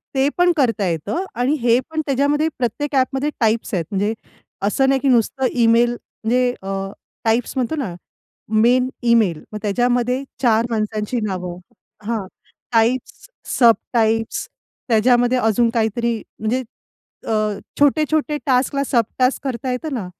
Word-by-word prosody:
ते 270 +1 +3
पण 355 0 +4
करता 230 -8 +1
येतं 170 - -2 0.2
आणि 255 +4 +2
हे 235 0 +4
पण 315 0 -2
त्याच्यामध्ये 285 +3 +1
प्रत्येक 275 +4 -2
ॲपमध्ये 270 +2 +1
टाईप्स 225 -2 +1
आहेत. 175 -4 0
म्हणजे 205 +2 0 0.5
असं 265 +6 +2
नाही 270 0 +3
की 275 - -1
नुसतं 260 +2 +2
इमेल 235 0 +4
म्हणजे 245 +1 -1
अ, 195 - -7 0.5
टाइप्स 225 +1 +1
म्हणतो 260 +4 -1
ना, 255 - -3 0.7
मेन 250 +3 +4 0.2
इमेल, 195 -9 +2
मग 210 - -4
त्याच्यामध्ये 245 +4 +1 0.2
चार 230 -2 +3
माणसांची 215 +1 -2
नावं 180 -3 -4 0.5
हां, 220 -4 -2 0.5
टाइप्स, 235 +3 0 0.3
सब 235 -3 +7 0.2
टाइप्स, 225 -1 +1 0.4
त्याच्यामध्ये 245 +2 +3
अजून 230 0 +2
काहीतरी, 230 +1 0 0.2
म्हणजे 230 +4 -1 0.7
अ, - - 0 0.5
छोटे-छोटे 300 +1 +2
टास्कला 270 +1 +2
सब 235 -3 +2
टास्क 255 +1 +2
करता 260 0 -3
येतं 280 +4 -3
ना. 220 -7 -3
240 Hz, 135 wpm, -20 LUFS, 225-265 Hz, 0.7 s, सब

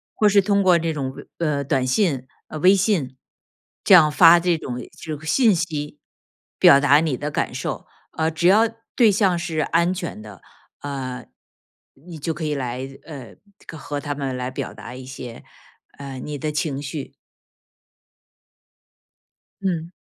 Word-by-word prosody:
或 215 - +3
是 200 0 +5
通 200 0 +1
过 180 -2 +5
这 165 -1 -2
种， 135 -3 -4 0.2
呃， 150 -4 -1
短 135 -2 0
信， 135 -3 +1 0.2
呃， 155 - -6
微 185 +5 +6
信， 180 - 0 0.7
这 190 - +8
样 155 -3 +6
发 170 +2 +7
这 170 -1 +1
种 125 - -6 0.3
这 155 -2 -5
个 155 - -13
信 215 - +3
息 155 -4 -4 0.6
表 140 - +8
达 145 +1 +5
你 155 -4 0
的 150 +1 -4
感 - - -2
受， - - -5 0.3
呃， 160 0 +1
只 160 +3 +1
要 220 +4 +5 0.3
对 235 -4 +6
象 190 -3 +2
是 160 -2 -3
安 170 +4 +1
全 175 - -6
的， 105 -5 -12 0.4
呃， 130 -3 -5 0.7
你 160 +4 -12
就 160 +2 -3
可 160 +2 -7
以 150 - -1
来 130 0 -4 0.2
呃， 135 -7 -10 0.4
和 145 0 -5
他 145 -1 -3
们 135 -2 -3
来 125 0 -4
表 - - -5
达 125 - -10
一 130 0 -9
些， 125 -3 -9 0.5
呃， 135 -2 -8
你 150 +2 -6
的 150 +3 -3
情 150 -2 -2
绪。 145 0 -6 2.5
嗯。 170 -3 -2
150 Hz, 170 characters per minute, -22 LUFS, 135-175 Hz, 2.5 s, 这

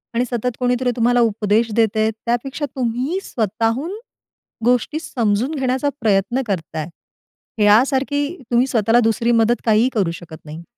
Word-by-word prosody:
आणि 245 +2 +1
सतत 240 0 -2
कोणीतरी 250 0 +1
तुम्हाला 245 +1 +2
उपदेश 220 0 +1
देतंय, 220 -1 +2
त्यापेक्षा 240 +6 -3
तुम्ही 255 +8 -1
स्वतःहून 230 - -2 0.7
गोष्टी 250 +5 +1
समजून 235 -2 -1
घेण्याचा 265 +1 0
प्रयत्न 215 +4 +1
करताय, 160 -4 -3 0.7
ह्यासारखी 265 +7 +3 0.2
तुम्ही 240 +2 +3
स्वतःला 230 -1 +2
दुसरी 230 +1 +1
मदत 230 +1 +2
काहीही 225 +2 +3
करू 190 -7 0
शकत 170 -2 -10
नाही. 155 +3 -9
235 Hz, 130 wpm, -19 LUFS, 215-255 Hz, 0.7 s, ह्यासारखी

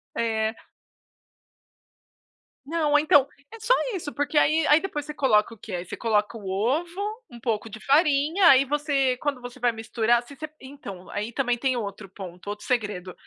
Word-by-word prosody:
Eh. 220 -1 0 2.1
Não, 300 -1 +2
então, 290 -2 +5 0.3
é 455 - -10
só 445 +3 +3 0.2
isso, 315 -6 -5
porque 290 +1 -1
aí 310 +2 +4
aí 300 - +6
depois 300 -6 -4
você 300 - -6
coloca 230 -6 +2
o - - -14
que, 200 -1 -9
eh, 175 0 -3
você - - -8
coloca 220 0 0
o 200 - -9
ovo, 305 - -1 0.3
um 240 - -11
pouco 225 -2 -2
de 220 +1 -9
farinha, 300 - +3
aí 270 -3 +8
você 275 -2 0
quando 280 -3 -3
você 245 +1 -9
vai 240 -1 +2
misturar, 230 +1 +1
se 280 - -13
você 310 +2 -7
então, 260 -9 -10
aí 210 +3 -4
também 245 -3 0
tem 260 +1 0
outro 200 -3 -5
ponto, 185 -1 -10
outro 210 0 -6
segredo, 205 -7 -2
250 Hz, 175 wpm, -25 LUFS, 220-295 Hz, 2.1 s, aí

